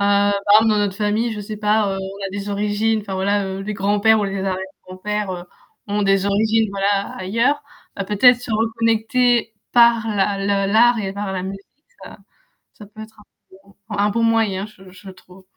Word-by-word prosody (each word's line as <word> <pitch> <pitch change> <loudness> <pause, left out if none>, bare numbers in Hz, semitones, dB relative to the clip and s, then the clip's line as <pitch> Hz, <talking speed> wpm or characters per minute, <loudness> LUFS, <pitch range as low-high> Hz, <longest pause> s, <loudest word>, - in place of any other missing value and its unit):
par 200 0 +3 0.3
exemple 225 - +2
dans 210 - +2
notre 200 -1 -1
famille, 220 +2 0
je 210 - -6
sais 210 +1 -7
pas, 210 -1 +1
heu, - - -4
on 195 +1 -6
a - - -7
des 200 0 -5
origines, 210 +2 0
enfin 195 -2 -6
voilà 200 +1 0
heu, 190 0 -5
les 210 - -4
grands-pères 205 +3 +2
ou - - 0
les 195 0 -3
arrières 190 -1 -1 0.3
grands-pères 205 +2 -4
heu, 175 -1 -7 0.4
ont 205 +1 -1
des 195 0 +2
origines 220 +2 +1
voilà, 200 0 -1
ailleurs. 230 +10 0 0.4
Heu, 195 - -1
peut-être 240 +5 +4
se 245 - -8
reconnecter 230 +1 +1 0.2
par 235 -1 +5
la 200 0 0 0.3
le 195 - -2
l'art 235 +1 +5
et 195 -2 -3
par 200 -1 -4
la 185 -1 -3
musique 195 +1 -7 0.4
heu - - -11
ça - - -14 0.6
ça 210 - -11
peut 215 +1 -13
être 220 0 -12
un 210 - -17 0.3
bon 195 +1 -20 0.2
un 205 +1 +2
bon 230 +2 0
moyen, 220 -4 +1
je 190 -3 -17
je 190 +1 -13
trouve. 185 0 -18
205 Hz, 205 wpm, -20 LUFS, 195-220 Hz, 0.6 s, par